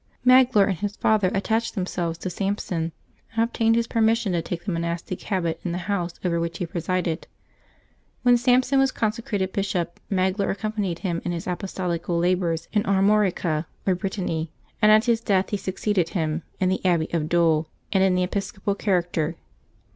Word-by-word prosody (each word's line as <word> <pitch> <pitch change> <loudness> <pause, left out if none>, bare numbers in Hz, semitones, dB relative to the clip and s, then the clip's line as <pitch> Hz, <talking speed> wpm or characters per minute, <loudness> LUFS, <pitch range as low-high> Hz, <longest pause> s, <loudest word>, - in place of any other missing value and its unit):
Magloire 255 -5 +6
and 190 - -2
his 205 +1 -3
father 210 -4 +2
at 195 - -1
tached 225 +2 0
themselves 175 -3 -2
to 185 - -4
Sampson, 180 -3 -2 0.4
and 225 - +3
obtained 225 -1 +2
his 235 0 +2
permis 225 -1 +3
sion 215 -4 -2
to 170 - +1
take 170 +1 -5
the 200 - -1
monastic 170 +1 -3
habit 170 -5 -1
in 175 - -2
the - - -2
house 180 -4 -2
over 170 -1 +1
which 170 0 -3
he 180 - -2
presided. 170 0 -2 1.0
When 245 -1 +6
Sampson 255 +2 +3
was 270 -1 +3
consecrated 210 -4 -2
bishop, 180 -4 -2
Magloire 190 +1 +1
accompanied 205 -4 -2
him 170 -2 -1
in 175 - -2
his 170 - -4
apostolical 180 -2 -2
labors 170 -2 0
in 210 - +3
Armorica, 190 -5 +2 0.2
or 190 - +3
Brittany, 180 -4 -3 0.3
and 210 -1 +6
at 215 +1 +6
his 230 -2 +2
death 195 -4 +1
he 205 - +1
succeeded 190 -2 -1
him 160 -2 -1 0.2
in 185 - +2
the 190 - -1
Abbey 170 -4 +2
of 155 -2 0
Dole 165 -2 +3 0.3
and 190 -1 +4
in 190 -1 +3
the 180 - +2
episcopal 195 +1 -2
character. 175 -5 0
185 Hz, 175 wpm, -24 LUFS, 170-210 Hz, 1.0 s, Magloire